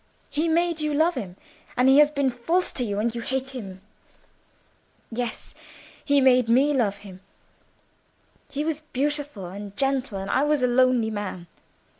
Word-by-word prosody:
He 310 +3 0
made 335 0 +1
you 300 -1 -1
love 320 +4 +3
him, 180 - -6 0.4
and 250 +1 +4
he 270 +2 +7
has 295 0 +6
been 280 -3 0
false 325 +10 -1
to 250 - -1
you; 205 -3 -3
and 225 +2 0
you 235 - -4
hate 265 +2 -3
him. 195 -8 -8 1.3
Yes, 235 0 -4 0.5
he 285 -1 +3
made 255 -3 +4
me 270 +5 +4
love 215 -7 +1
him: 185 -2 -11 1.3
he 290 +1 -3
was 315 -1 -2
beautiful 290 -6 -2
and 200 +2 -8
gentle, 270 -5 0
and 195 +1 -4
I 270 - +2
was 295 -3 +1
a - - +4
lonely 245 -2 +3
man. 205 -4 -5
255 Hz, 165 wpm, -25 LUFS, 220-290 Hz, 1.3 s, he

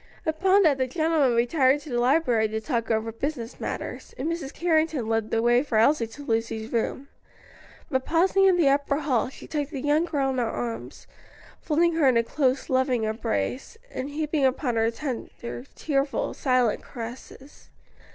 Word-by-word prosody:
Upon 375 +5 +3
that 290 -5 +3
the 260 - +1
gentlemen 310 -4 +2
retired 260 +3 +3
to 295 - -10
the 240 - 0
library 245 -4 +3
to 220 +1 -3
talk 230 -1 -2
over 225 0 0
business 240 0 -5
matters, - - -6
and 270 - -3
Mrs. 330 -5 -3
Carrington 315 -6 +1
led 225 -1 0
the 225 - 0
way 240 +1 +4
for 260 -6 -1
Elsie 230 +1 +3
to 285 +6 -11
Lucy's 225 -1 -2
room. 250 +4 -1 0.8
But 260 -3 -1
pausing 370 +5 +3
in 375 -2 +5
the 330 -5 +3
upper 280 0 +2
hall, 255 -6 +1
she - - -12
took 295 -2 -3
the 290 -4 -5
young 295 +4 +2
girl 280 -5 0
in 260 - -2
her 235 -2 0
arms, 230 0 -5 0.6
folding 335 +2 +2
her 300 -4 +4
in 255 -3 +4
a 230 - +3
close, 265 +1 0
loving 260 -3 +1
embrace, 220 - -2
and 260 +2 -4
heaping 300 0 -1
upon 260 -1 +1
her 225 0 +2
tearful, 240 -1 -6
tender, 275 -2 -1
silent 255 -5 +1
caresses. 255 +3 -10
265 Hz, 175 wpm, -25 LUFS, 235-305 Hz, 0.8 s, in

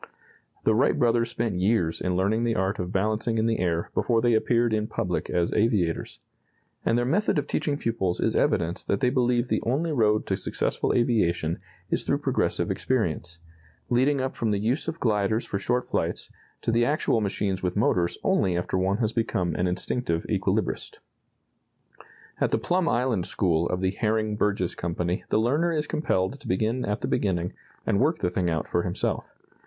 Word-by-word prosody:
The 110 - +3
Wright 125 +6 +3
brothers 115 -1 +2
spent 110 -6 -2
years 95 -5 +1
in 90 -1 0
learning 100 +5 +1
the 115 -1 +1
art 95 +2 0
of 90 0 -3
balancing 110 +4 0
in 110 - +2
the 115 -1 +1
air 85 -2 -1
before 115 -2 +2
they 120 0 +3
appeared 115 +1 +2
in 105 0 0
public - - -2
as 85 -1 0
aviators. 105 -7 0 0.7
And 115 - +2
their 120 - +1
method 170 +8 +1
of 145 - 0
teaching 150 -1 -1
pupils 95 -9 -1
is - - +1
evidence 85 +2 +1
that 100 - 0
they 125 - +2
believe 125 -2 +2
the - - 0
only 150 +8 0
road 110 -6 +2
to 95 - 0
successful 100 - -1
aviation 85 -9 +1 0.3
is - - +1
through - - +1
progressive - - +1
experience, 85 -8 -1 0.5
leading 135 +4 +3
up 130 0 -3
from 115 - -1
the 105 - +1
use 120 +10 -1
of 165 0 -4
gliders 110 0 +1
for 100 - -3
short 125 +5 0
flights - - -2 0.3
to - - +1
the 115 +1 +3
actual 120 -4 +1
machines 100 -2 -1
with 90 -1 -1
motors 90 -4 +1
only 90 -2 +2
after 90 +1 -1
one 95 +2 +1
has 110 -1 0
become 95 -7 0
an 90 +3 0
instinctive 90 -1 -1
equilibrist. - - -1 1.4
At - - +2
the - - +2
Plum 180 -1 +1
Island 120 -7 0
school 85 -3 +1
of 90 - -1
the 95 0 +1
Herring 110 +1 0
Burgess 100 -4 0
Company 85 +1 -2
the - - +2
learner 145 +10 +2
is 150 -2 0
compelled 135 -5 -1
to - - -11
begin 110 +7 0
at 105 +1 -2
the - - -1
beginning 90 -3 0 0.3
and 100 - +2
work 155 +5 +2
the 90 - -1
thing 90 -1 0
out 80 -2 -1
for - - +1
himself. - - -2
110 Hz, 185 wpm, -26 LUFS, 90-120 Hz, 1.4 s, The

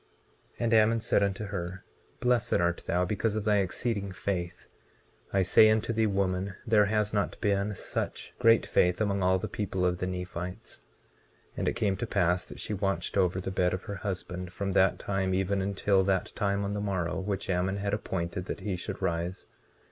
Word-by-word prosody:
19:10 - - -29
And 115 -1 +2
Ammon 110 +1 +5
said 110 - +2
unto 100 +1 0
her: 95 -2 -5 0.4
Blessed 125 -1 +2
art 85 0 0
thou 90 +1 +2
because 105 +3 -1
of 110 - -2
thy 105 -1 +4
exceeding 100 +1 -1
faith; 90 -2 -3 0.7
I 95 -1 +3
say 110 +4 +6
unto 110 +1 +1
thee, 110 0 +2
woman, 95 -1 -1
there 110 -3 +5
has 105 0 0
not 100 -1 -1
been 100 0 0
such - - -4
great 115 -2 +5
faith 90 +1 +2
among 100 -2 0
all 95 0 +3
the 95 - -4
people 95 -3 -2
of 90 0 +1
the 90 - -1
Nephites. 90 0 -6 0.7
19:11 - - -29
And - - -1
it - - +1
came 100 -3 0
to 120 - -3
pass 90 -2 +1
that - - -11
she - - -3
watched 95 -3 -1
over 95 -2 +2
the 95 +1 -4
bed 90 -1 +1
of 90 - -7
her 100 - -5
husband, 90 -2 -5
from 100 +2 -3
that 95 0 +3
time 95 -2 -1
even 95 +1 0
until 100 0 +2
that 95 -1 0
time 100 0 0
on 100 0 -2
the 105 - -2
morrow 95 -4 -1
which 100 0 -3
Ammon 95 +1 0
had 100 0 -2
appointed 85 -3 -3
that 100 - -5
he 95 -1 -2
should 90 - -5
rise. 85 +2 -2
95 Hz, 200 wpm, -29 LUFS, 90-105 Hz, 0.7 s, say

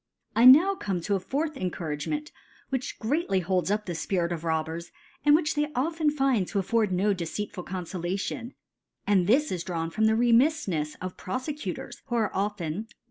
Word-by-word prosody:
J' 235 +2 +7
Now 320 +10 +8
come 195 - -2
to 200 - -1
a 195 - +2
fourth 290 - -2
Encouragement, 180 - -3 0.4
which 260 -2 -3
greatly 230 - 0
holds. 180 +1 0
up 210 +1 0
the 175 - -3
Spirits 170 +1 -1
of 165 - -5
obbers, 160 +1 -2 0.3
and 295 0 +6
which 310 -1 +1
they 295 0 -1
often 315 +4 +1
find 270 -9 +1
to 205 - -3
afford 210 +1 +1
no 195 +3 +2
deceitful 180 +1 -5
Confolation; 185 +6 -4 0.5
and 190 -4 +3
this 285 +8 +3
is^ 175 -2 -2
drawn 165 -2 -3
from 220 +5 +1
the 220 - +4
Remiflhels 235 - +2
of 185 0 -5
Profecutors, 255 - -5
who 240 - -2
are 220 -3 +1
often, 195 -5 -1
1. 215 +6 -5
205 Hz, 175 wpm, -27 LUFS, 180-265 Hz, 0.5 s, Now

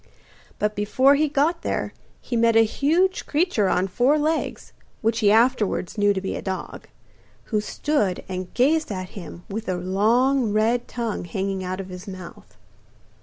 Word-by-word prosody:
But 210 0 -1
before 255 +7 +3
he 300 +1 +2
got 300 +4 +1
there - - -2 0.3
he 240 - -4
met 230 0 +3
a 225 - +7
huge 330 - +1
creature 290 - +1
on 180 +2 +1
four 250 +10 +2
legs, 310 +2 -2 0.3
which 225 +1 +1
he 205 -2 +4
afterwards 225 -5 +2
knew 205 -1 +3
to 195 - 0
be 190 - -4
a - - -4
dog, 190 -1 -5 0.7
who 210 - +3
stood 210 -5 -1
and 185 -1 -5
gazed 300 +2 +2
at 185 -2 -4
him 175 -2 -10
with 215 +1 -5
a 185 - 0
long 220 +7 +2
red 230 +3 +1
tongue 230 -6 -3
hanging 190 +2 -3
out 185 +1 -4
of 190 -1 -6
his 180 +2 -9
mouth. 185 -3 -10
215 Hz, 170 wpm, -23 LUFS, 190-265 Hz, 0.7 s, a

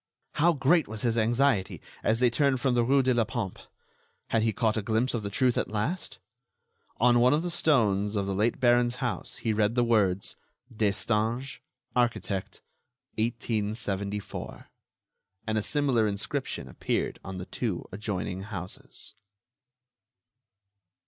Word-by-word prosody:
How 170 +3 +3
great 155 +3 +3
was 110 0 -6
his 115 -2 +1
anxiety 115 -2 +2 0.2
as 110 +1 +1
they 125 -1 +4
turned 140 0 +2
from 130 0 +1
the 120 -1 +3
rue 135 +3 +3
de 130 0 +3
la 120 -1 +3
Pompe! 110 -5 -4 0.7
Had 115 - +2
he 110 0 +2
caught 110 +1 +1
a 110 - 0
glimpse 110 +4 0
of 115 - -1
the 100 - -4
truth 125 +3 +2
at - - -1
last? 110 - -3 0.8
On 120 0 +5
one 125 +2 +5
of 155 - -1
the 175 - -2
stones 110 - +2
of 100 -1 0
the 100 - -2
late 110 +4 +1
Baron's 120 0 +3
house 125 -2 -3
he 110 - -1
read 105 +1 +1
the 120 - +3
words: 100 -5 +2 0.4
"Destange, 110 +4 0 0.4
architect, 120 -5 -1 0.6
1874." 105 -3 -2 0.8
And 110 0 0
a - - -1
similar 130 -3 +2
inscription 100 -1 -3
appeared - - -2
on 95 0 -6
the 90 - -5
two 95 -1 -3
adjoining 95 -2 -3
houses. 95 -2 -6
115 Hz, 145 wpm, -28 LUFS, 105-125 Hz, 0.8 s, On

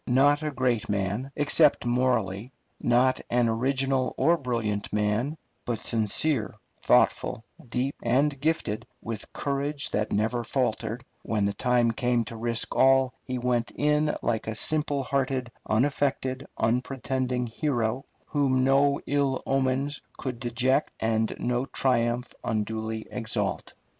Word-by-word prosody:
Not 140 +4 +4
a 155 - -1
great 125 -5 0
man, 105 +6 -1
except 145 -1 +3
morally; 120 -3 0 0.3
not 125 +2 +3
an 120 0 +3
original 130 +2 0
or 170 - +4
brilliant 115 -8 -2
man, 105 +8 0 0.3
but 120 -2 -2
sincere, 110 +2 0 0.3
thoughtful, 110 - +2 0.3
deep, 130 +4 -1
and 135 +3 +1
gifted 145 -9 -1
with 110 -3 -6
courage 140 +1 -2
that 105 +1 -1
never 110 +3 0
faltered; 120 -1 -1 0.2
when 105 -3 0
the 100 - 0
time 125 -1 +2
came 120 0 0
to 115 - -7
risk 115 +1 -1
all, 135 -1 +4
he 130 - -4
went 120 -1 0
in 150 +1 +2
like 115 -2 -1
a 110 - -2
simple 150 +1 0
hearted, 130 -2 -1 0.2
unaffected, 130 +2 0
unpretending 125 +1 0
hero, 120 -1 -1 0.2
whom 135 -3 +1
no 140 +1 +4
ill 140 -2 0
omens 135 +2 0 0.2
could 125 -3 -4
deject 130 +4 +1
and 110 0 0
no 125 +2 -1
triumph 120 -1 0
unduly 110 0 -2
exalt. 110 -4 -2
125 Hz, 130 wpm, -27 LUFS, 115-135 Hz, 0.3 s, Not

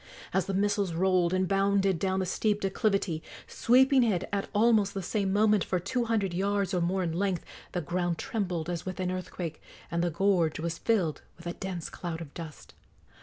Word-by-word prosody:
As 190 - +1
the 195 - -1
missiles 200 -2 +1
rolled 180 0 +2
and 185 0 +1
bounded 195 -2 +2
down 190 +1 0
the - - 0
steep 205 +3 0
declivity, 195 -4 0 0.2
sweeping 265 +2 +4
it 200 -6 +1
at 200 -1 -1
almost 210 -2 +3
the 195 - -3
same 195 +1 0
moment 210 0 +4
for 185 - -1
two 235 +7 -1
hundred 210 -5 0
yards 195 +1 0
or 180 - +1
more 185 +2 +1
in 165 -2 -1
length, 185 0 -1 0.3
the 180 - -1
ground 175 +2 -1
trembled 180 -7 -2
as 175 -2 -3
with 185 0 -5
an 185 -1 0
earthquake, 180 -3 -5 0.3
and 170 0 0
the 175 - +2
gorge 170 -2 +2
was 165 +1 -3
filled 190 -10 +1 0.2
with 170 - -14
a 175 - -2
dense 180 -3 -5
cloud 170 -2 -5
of 160 -4 -9
dust. 160 -3 -9
190 Hz, 195 wpm, -29 LUFS, 175-200 Hz, 0.3 s, sweeping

